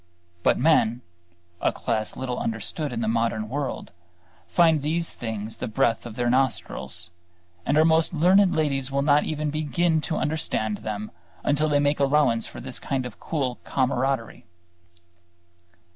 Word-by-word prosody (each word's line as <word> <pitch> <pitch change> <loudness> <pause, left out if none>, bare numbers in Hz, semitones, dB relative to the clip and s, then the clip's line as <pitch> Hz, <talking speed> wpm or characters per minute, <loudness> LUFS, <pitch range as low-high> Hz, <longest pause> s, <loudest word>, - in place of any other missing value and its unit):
But - - +3
men 125 -5 +3 0.6
(a - - +3
class 110 -1 -2
little 125 -1 -3
understood 115 +7 -3
in 115 -1 -3
the 110 - -1
modern 115 -1 0
world) 140 +1 -4 0.6
find 160 - +4
these 165 +3 -1
things 110 -1 -5
the - - -4
breath 115 0 +1
of 110 - -9
their 120 0 0
nostrils; 130 -7 -1 0.6
and 140 - +3
our 155 - +6
most 160 0 +3
learned 180 +3 +4
ladies 140 -4 0
will 140 0 +1
not 145 0 +4
even 150 -1 -2
begin 155 +2 +1
to 155 +1 -2
understand 130 -9 -1
them 105 0 -5 0.3
until 150 +2 +2
they 145 -1 +3
make 145 +1 +1
allowance 140 -5 +3
for - - -9
this - - -5
kind 130 -2 -2
of 125 - -8
cool 135 -6 -2
camaraderie. 130 -5 -1
135 Hz, 150 wpm, -25 LUFS, 115-155 Hz, 0.6 s, our